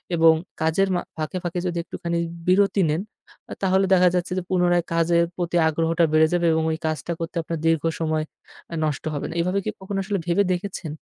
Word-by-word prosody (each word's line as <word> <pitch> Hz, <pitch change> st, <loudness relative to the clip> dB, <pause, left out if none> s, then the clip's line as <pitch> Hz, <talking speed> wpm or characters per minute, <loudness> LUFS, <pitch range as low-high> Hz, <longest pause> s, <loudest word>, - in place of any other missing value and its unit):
এবং 165 Hz, -1 st, +6 dB, 0.3 s
কাজের 170 Hz, +5 st, +2 dB
মা 175 Hz, -, 0 dB, 0.2 s
ফাঁকে, 155 Hz, +3 st, -3 dB
ফাঁকে 175 Hz, 0 st, -2 dB
যদি 175 Hz, -, -3 dB
একটুখানি 170 Hz, 0 st, -4 dB, 0.3 s
বিরতি 195 Hz, +1 st, +3 dB
নেন, 155 Hz, +4 st, 0 dB, 0.5 s
আ -, -, -3 dB
তাহলে 190 Hz, 0 st, +3 dB
দেখা 180 Hz, -1 st, +6 dB
যাচ্ছে 180 Hz, +1 st, -1 dB
যে, 185 Hz, -, -1 dB
পুনরায় 175 Hz, -2 st, +2 dB
কাজের 170 Hz, 0 st, +3 dB
প্রতি 175 Hz, -1 st, -1 dB
আগ্রহটা 165 Hz, +1 st, +1 dB
বেড়ে 155 Hz, 0 st, +5 dB
যাবে 175 Hz, -1 st, +2 dB
এবং 160 Hz, 0 st, +1 dB
ওই 160 Hz, -, -2 dB
কাজটা 155 Hz, +2 st, -3 dB
করতে 165 Hz, +1 st, -5 dB
আপনার 165 Hz, 0 st, -4 dB
দীর্ঘ 165 Hz, -2 st, +2 dB, 0.2 s
সময় 155 Hz, -1 st, 0 dB, 0.5 s
আ -, -, -2 dB
নষ্ট 150 Hz, -2 st, -2 dB
হবে 145 Hz, -, -3 dB
না। -, -, -6 dB
এভাবে 180 Hz, +3 st, 0 dB
কি 215 Hz, -, 0 dB
কখনো 195 Hz, +1 st, -5 dB
আসলে 200 Hz, +1 st, -1 dB
ভেবে 175 Hz, +4 st, +3 dB
দেখেছেন? 180 Hz, -3 st, -5 dB
170 Hz, 200 wpm, -23 LUFS, 160-185 Hz, 0.5 s, এবং